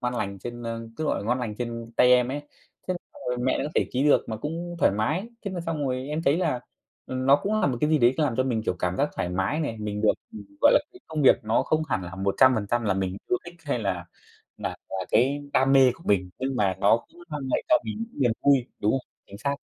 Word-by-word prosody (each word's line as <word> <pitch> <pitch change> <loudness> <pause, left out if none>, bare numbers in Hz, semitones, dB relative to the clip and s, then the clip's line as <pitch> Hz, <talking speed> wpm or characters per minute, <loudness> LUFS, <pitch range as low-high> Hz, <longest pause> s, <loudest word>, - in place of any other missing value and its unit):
ngon 125 0 -1
lành 100 -4 -3
trên, 120 +4 -7
ơ, 115 0 -5
cứ, 155 - -2
gọi - - 0
là, - - -6
ngon 120 +2 +1
lành 110 -4 -3
trên 115 -1 -5
tay 125 0 +6
em 125 0 +4
ấy. 145 +2 -3 0.5
Thế 185 - +1 0.2
xong - - -12
rồi 125 - -1
mẹ 130 +1 +1
nó - - -1
có 150 - -3
thể - - +2
ký 130 - +1
được 150 - +4
mà 110 - -3
cũng 170 +8 -5
thoải - - +4
mái. 155 - -1 0.2
Thế 200 - -2
là 185 -2 -4
xong 160 -4 -2
rồi 130 0 -2
em 155 +2 -2
thấy 150 +1 +3
là, 130 -9 0 0.5
ừm, 130 0 -3
nó 140 - +7
cũng 210 +8 -1
là - - +3
một 130 -4 0
cái 150 - +2
gì 155 - +4
đấy 120 +1 +4
làm 145 -7 +1
cho 130 - +3
mình, 120 -4 -1
kiểu, 100 - -1
cảm 90 0 -1
giác - - +2
thoải 90 - -1
mái 95 - -1
này, 115 -8 -2
mình 105 -1 -3
được, 110 - +5 0.5
gọi 290 - +7
là - - +6
cái 370 - -15
công 155 -2 -2
việc 135 - +7
nó 110 +1 +2
không 155 0 +1
hẳn 95 -8 0
là 90 +1 -7
100% 110 +3 +3
là 100 - +2
mình 95 -1 -2
yêu 120 - +3
thích, 175 0 -10
hay 140 -4 -1
là 95 -5 -2 0.5
là - - -4
là 95 -1 -3
cái 135 +5 +3
đam 135 +1 +3
mê 135 -2 +7
của 165 - -17
mình, 95 -3 +2
nhưng 130 0 -2
mà 95 -2 +2
nó 100 +3 +5
cũng 175 - -17
mang 150 -3 -4
lại - - +1
cho 315 - +6
mình - - -4
những - - -11
niềm 120 -3 +3
vui, 135 -4 +4
đúng 105 +1 +2
không? 135 -1 -2 0.2
Chính 100 - -11
xác. 140 +4 -2
125 Hz, 275 wpm, -26 LUFS, 110-145 Hz, 0.5 s, nó